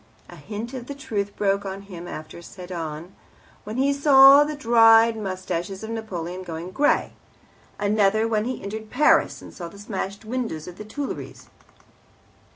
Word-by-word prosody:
A - - -11
hint 210 - -7
of 250 -2 -7
the 280 - -6
truth 205 -7 -4
broke 200 -1 0
on 195 0 -6
him 175 -3 -9
after 155 +1 -8
Sedan, 170 -1 -7 0.5
when 215 +3 -6
he 275 +2 +2
saw 275 0 +8
the 300 +1 -4
dyed 230 -3 +5
moustaches 190 -1 -4
of 220 - -6
Napoleon 185 -5 -5
going 170 0 -7
grey; 290 +7 +1 0.6
another 210 +1 +2
when 215 -1 0
he 255 +1 -4
entered 215 +2 -6
Paris, 295 +6 +3
and - - -12
saw 175 - -7
the 185 - -13
smashed 200 0 -5
windows 225 -10 -4
of 180 +2 -10
the 210 - -7
Tuileries. 275 +6 -6
210 Hz, 160 wpm, -24 LUFS, 185-230 Hz, 0.6 s, saw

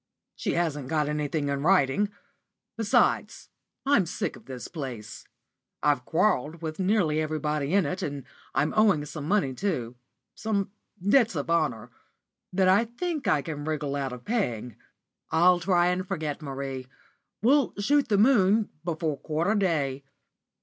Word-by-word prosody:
She - - -2
hasn't 150 -6 -1
got 150 0 0
anything 150 0 -1
in 140 0 -1
writing. 185 +3 +3 0.7
Besides, 220 -2 +1 0.4
I'm 270 -11 +3
sick - - -3
of - - -15
this 130 -2 -7
place. 125 -9 -7 0.6
I've 145 -4 +2
quarrelled 165 -3 +1
with 155 -1 -4
pretty 185 - -1
nearly 160 -8 +2
everybody 155 0 -1
in 200 -4 +4
it, 180 +6 -3
and 140 -2 -4 0.3
I'm 150 - +1
owing 200 -9 +4
some 150 0 -6
money 185 -8 +1
too 125 - -2 0.4
some 200 -3 -2 0.4
debts 230 -2 +4
of 145 +2 -2
honour 150 -10 0 0.6
that 185 0 +2
I 200 +5 +5
think 300 +6 -4
I 145 - +3
can 145 0 -5
wriggle 150 -2 -2
out 135 -2 -2
of 125 -1 -9
paying. 125 - -2 0.5
I'll 175 +2 +5
try 175 0 +3
and 180 +1 -1
forget 155 -2 -3
Marie. 135 -2 -5 0.6
We'll 275 +2 +3
'shoot 285 +8 +2
the 205 - +2
moon' 210 -2 +4
before 160 -4 -2
quarter 165 +6 0
day." 150 -9 0
160 Hz, 150 wpm, -27 LUFS, 145-200 Hz, 0.7 s, I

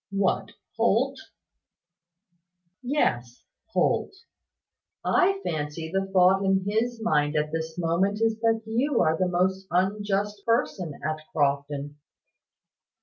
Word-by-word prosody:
"What, 195 -1 0 0.2
Holt?" - - +2 1.6
"Yes, 130 - -1 0.2
Holt. - - +1 0.9
I 385 +1 +3
fancy 155 +1 -3
the 195 0 0
thought 190 0 +4
in 190 -1 +2
his 225 +3 0
mind 150 -6 +1
at 150 0 0
this 160 0 -4
moment 180 +5 +1
is 225 -1 +1
that 225 0 +1
you 240 +5 0
are 160 -2 +3
the 185 +2 0
most 190 +2 0
unjust 200 +2 0
person 190 - -1
at 155 0 -2
Crofton." 145 0 -1
190 Hz, 110 wpm, -26 LUFS, 155-210 Hz, 1.6 s, thought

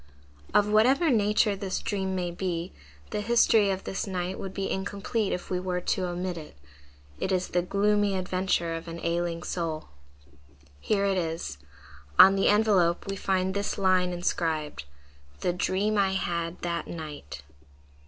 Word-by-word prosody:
Of 205 - +4
whatever 255 +9 +4
nature 210 -1 +3
this 195 -1 -3
dream 190 -2 -2
may 175 -1 -2
be, 175 -1 -3 0.4
the 210 - -1
history 225 -2 +4
of 190 0 -2
this 195 - -3
night 185 -1 -3
would 190 - -5
be 195 0 -3
incomplete 200 +2 -2
if 180 - -4
we 180 - +1
were 180 -1 -2
to 180 +1 -1
omit 175 0 -3
it: 150 - -12 0.6
it 190 - -1
is 185 -1 0
the 175 - +1
gloomy 205 +2 +1
adventure 185 -2 0
of 165 +1 -6
an 165 0 -6
ailing 170 0 -1
soul. 165 -3 -3 0.9
Here 200 - +1
it 195 -2 +2
is. 160 - -4 0.6
On 195 +1 +9
the 195 - +2
envelope 200 -5 +3
we 195 - -3
find 190 -1 0
this 200 +1 -2
line 185 -2 +3
inscribed, 160 - -2 0.6
"The 175 - +1
Dream 200 +4 0
I 190 -1 +2
had 170 -2 -2
that 170 -1 -2
Night." 145 - -7
185 Hz, 155 wpm, -27 LUFS, 170-200 Hz, 0.9 s, On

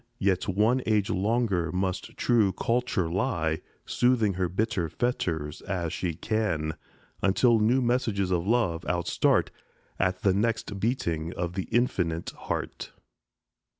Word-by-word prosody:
Yet 95 -5 +1
one 105 +7 +2
age 105 -2 +2
longer 100 -4 +1
must 95 0 -3
true 110 -6 +3
Culture 115 -4 0
lie, 85 -4 -1 0.2
Soothing 120 -5 +2
her 90 -1 -1
bitter 95 -3 -1
fetters 80 - -2
as 85 -3 -3
she 85 -4 -2
can, 90 -8 -1 0.5
Until 115 +4 +4
new 120 +5 +3
messages 110 -6 0
of 90 0 0
love 105 -8 +1
outstart 90 -1 +1 0.5
At 90 0 0
the 95 - +4
next 105 -1 -1
beating 85 -8 -1
of 85 0 -3
the 95 0 -3
infinite 90 -9 0
Heart. - - -5
95 Hz, 125 wpm, -27 LUFS, 85-115 Hz, 0.5 s, Until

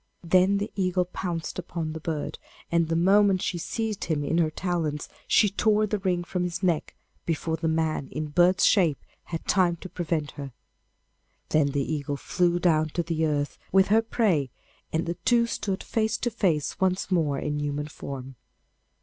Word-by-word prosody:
Then 185 +3 +4
the 205 +2 -3
eagle 185 -2 +1
pounced 175 -2 -4
upon 165 -3 -4
the 160 - -5
bird, 155 -2 -4 0.3
and 170 -1 +2
the 165 - 0
moment 195 +2 +4
she 175 - -1
seized 220 +3 -3
him 155 -3 -1
in 165 +4 +1
her 160 -2 +3
talons 160 -3 -2 0.2
she 210 - +5
tore 215 +1 +2
the 210 0 -2
ring 180 -2 0
from 180 +1 -3
his 180 +1 -3
neck 170 -4 0 0.3
before 165 0 -1
the 160 0 -2
man 160 -3 0
in 155 0 -4
bird's 175 +4 +4
shape 170 -9 +4 0.3
had 165 -1 -5
time 180 -4 +3
to 185 - -10
prevent 160 -5 -2
her. 140 -3 -8 1.0
Then 155 -2 +3
the 140 0 0
eagle 145 -1 -3
flew 175 +3 +1
down 155 -3 +2
to 170 - +1
the 160 -1 0
earth 145 -1 -2
with 190 +1 +4
her 220 +2 +5
prey, 205 - +1 0.4
and 160 +1 0
the 170 +1 -3
two 235 -1 +4
stood 195 -4 -3
face 220 0 0
to 240 - -2
face 175 -10 0
once 190 0 0
more 155 -6 +2
in 150 +1 -2
human 145 0 -2
form. 135 -3 -8
170 Hz, 180 wpm, -26 LUFS, 155-190 Hz, 1.0 s, she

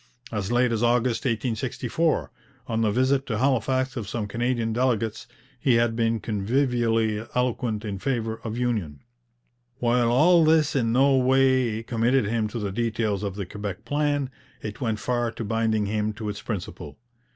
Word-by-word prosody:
As 105 -1 -2
late 120 0 +3
as 115 -1 0
August 120 +1 +1
1864, 125 +6 -1 0.3
on 115 -1 -1
the 110 - +2
visit 130 +5 +1
to 110 - -1
Halifax 130 +1 +1
of 110 -6 -4
some 110 0 -2
Canadian 115 +1 -1
delegates, 115 -3 0 0.3
he 125 -1 +3
had 115 -1 +2
been 115 0 +1
convivially 115 0 0
eloquent 120 -3 -1
in 100 -2 -4
favour 115 -2 -2
of 115 0 -4
union. 105 - -2 0.8
While 120 -2 +2
all 165 +7 +5
this 155 -2 +3
in 115 -4 +1
no 135 +3 +4
way 130 -3 +3
committed 115 +2 +1
him 110 +1 0
to 110 - -6
the 105 -3 -3
details 110 -2 -1
of 100 -2 -3
the 100 -2 -4
Quebec 100 +1 -6
plan, 145 -2 0 0.3
it 105 -1 -6
went 110 -4 0
far 120 +1 -1
to 115 - -5
binding 110 0 +1
him 105 +1 -1
to 105 0 -5
its 105 0 -5
principle. 105 -6 -6
115 Hz, 165 wpm, -25 LUFS, 110-125 Hz, 0.8 s, all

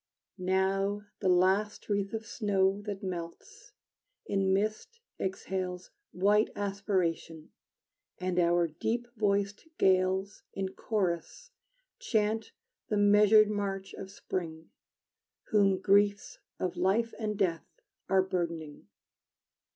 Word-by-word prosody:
Now 195 +2 0 0.2
the 190 - +1
last 190 +4 +2
wreath 200 -1 -1
of 225 0 -4
snow 200 -3 +1
That 200 0 -4
melts, 180 - -7 0.5
in 195 - +1
mist 215 - -1 0.2
exhales 185 -1 -4 0.2
White 205 +3 +3
aspiration, 190 -6 -2 0.7
and 180 -1 -1
our 175 0 +3
deep 225 +9 -2
voiced 205 +3 0
gales 190 +1 +2
In 190 -1 -2
chorus 205 - -3 0.5
chant 220 - 0 0.4
the 210 - 0
measured 210 +1 +6
march 195 -2 -3
of 190 - -8
spring, 165 -4 -5 0.8
Whom 200 -3 +3
griefs 200 +1 +2 0.2
of 180 -1 -2
life 200 +6 +1
and 210 -2 -2
death 175 -5 0 0.4
Are 190 -1 +4
burdening! 170 - -4
195 Hz, 105 wpm, -30 LUFS, 185-210 Hz, 0.8 s, measured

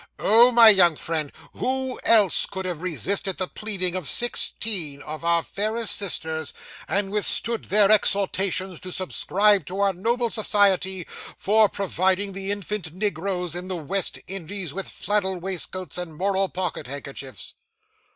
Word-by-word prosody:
Oh, 235 +4 +6
my 235 -2 +8
young 180 -6 +5
friend, 155 -2 -4 0.2
who 260 0 -3
else 210 -6 +4
could 190 -1 -6
have 175 -4 -4
resisted 185 +2 -2
the 185 - -2
pleading 190 -5 -2
of 180 -6 -3
sixteen 200 -10 +2
of 155 +2 -8
our 170 0 +1
fairest 215 +2 0
sisters, 160 -5 -1 0.3
and 195 -1 -1
withstood 215 +2 +1
their 205 +1 +4
exhortations 195 -3 +1
to 185 - -9
subscribe 195 0 +1
to 190 +2 -5
our 200 -1 +2
noble 235 +5 -1
society 190 -4 +2 0.3
for 215 +1 +3
providing 190 0 -1
the 195 0 -4
infant 200 -4 -4
negroes 180 -2 -2
in 180 +1 -5
the 185 - -3
West 180 +4 -1
Indies 190 -3 -5
with 195 +2 -5
flannel 195 -2 -2
waistcoats 185 0 -4
and 165 -4 -7
moral 195 +1 0
pocket 180 -8 -4
handkerchiefs? 140 -1 -7
190 Hz, 140 wpm, -23 LUFS, 175-205 Hz, 0.3 s, my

